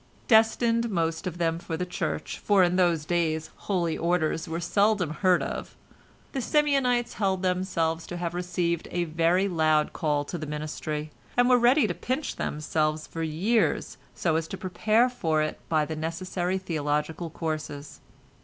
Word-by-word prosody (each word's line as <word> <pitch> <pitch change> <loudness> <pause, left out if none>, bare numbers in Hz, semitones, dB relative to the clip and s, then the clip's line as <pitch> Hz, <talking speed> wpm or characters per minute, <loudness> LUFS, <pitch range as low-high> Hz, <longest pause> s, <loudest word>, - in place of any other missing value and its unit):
Destined 230 +1 +4
most 165 -3 -1
of 175 -1 -4
them 165 -1 0
for 165 -1 -4
the 180 - -2
Church 180 - -3
(for 200 -3 +4
in 175 0 +2
those 170 -4 +2
days 160 -2 0
"holy 175 -5 -1
orders" 165 -1 0
were 165 +1 -2
seldom 200 -1 +2
heard 180 +3 +2
of), - - -5 0.6
the 270 - -2
Simeonites 270 -4 +2
held 190 -2 0
themselves 175 -3 0
to 175 - -5
have 175 -1 -3
received 175 -1 -1
a 175 - -1
very 170 +4 +2
loud 155 -4 +2
call 150 -2 0
to 175 - -5
the 155 - -5
ministry, 150 0 -4 0.3
and 245 0 +5
were 250 -1 +5
ready 250 +4 +5
to 190 - -1
pinch 260 - -3
themselves 155 0 -1
for 165 - -6
years 175 +9 0 0.2
so 160 -3 +1
as 160 0 -2
to - - -6
prepare 215 +5 +2
for 160 -11 0
it 155 - -4
by 155 -2 +2
the 160 - -4
necessary 175 +3 -2
theological 155 -1 -2
courses. 155 -3 -5
170 Hz, 165 wpm, -27 LUFS, 160-190 Hz, 0.6 s, and